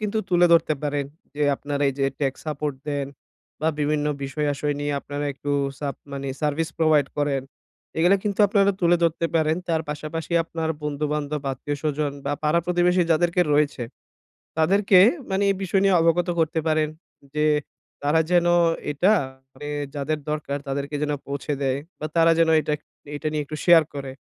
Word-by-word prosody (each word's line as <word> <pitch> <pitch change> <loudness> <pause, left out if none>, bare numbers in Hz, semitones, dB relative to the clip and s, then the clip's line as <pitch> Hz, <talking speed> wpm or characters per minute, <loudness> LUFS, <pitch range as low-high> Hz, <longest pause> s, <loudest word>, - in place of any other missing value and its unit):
কিন্তু 215 +1 -1
তুলে 175 0 +5
ধরতে 165 -2 +4
পারেন 145 -1 -1 0.3
যে, 150 - -2
আপনারা 145 0 -3
এই 135 - -2
যে 135 - +2
টেক্স 135 -2 -1
সাপোর্ট 150 -1 -2
দেন 145 -2 -1 0.5
বা 155 - +2
বিভিন্ন 150 0 +1 0.2
বিষয় 140 +2 -2
আসয় 145 +1 -1
নিয়ে 145 0 -1
আপনারা 145 +1 -5
একটু 140 +1 -6 0.3
সাভ 140 -2 -3 0.2
মানে 140 0 -4
সার্ভিস 155 +1 0
প্রোভাইড 155 -4 +4
করেন। 145 -2 +1 0.6
এগুলা 175 +4 +5
কিন্তু 205 -2 -2
আপনারা 200 0 +3
তুলে 175 0 +4
ধরতে 165 0 +1
পারেন। 160 0 +2
তার 160 -1 +1
পাশাপাশি 155 +3 -5
আপনার 165 -1 -4
বন্ধুবান্ধব, 150 0 -2
আত্মীয়স্বজন, 145 +2 -2
বা 140 - -1
পাড়া 155 +2 +3
প্রতিবেশী 180 +1 +3
যাদেরকে 175 +2 +2
রয়েছে। 145 -3 +1 0.8
তাদেরকে 190 +4 +4 0.3
মানি 195 +1 +1
এই 195 - 0
বিষয় 190 +1 +1
নিয়ে, 195 -1 +4
অবগত 165 +2 +2
করতে 160 0 +1
পারেন 155 -1 +2 0.5
যে, 150 0 +1 0.6
তারা 150 +3 +3
যেন 175 -1 +4 0.5
এটা, 180 +9 +3 0.4
মানে 145 +3 -8 0.3
যাদের 150 +2 -2
দরকার 150 -2 -2
তাদেরকে 140 +2 -3
যেন 150 - 0
আ - - -14
পৌঁছে 140 +1 -3
দেয়, 135 0 +1 0.2
বা 155 - -3
তারা 165 0 +5
যেন 165 -1 +4
এটা 150 - -2 0.4
এটা 150 - -2
নিয়ে 150 -1 -1
এটা - - -8
একটু 155 - -5
শেয়ার 170 -2 +7
করে। 135 -2 -5
150 Hz, 170 wpm, -24 LUFS, 145-165 Hz, 0.8 s, শেয়ার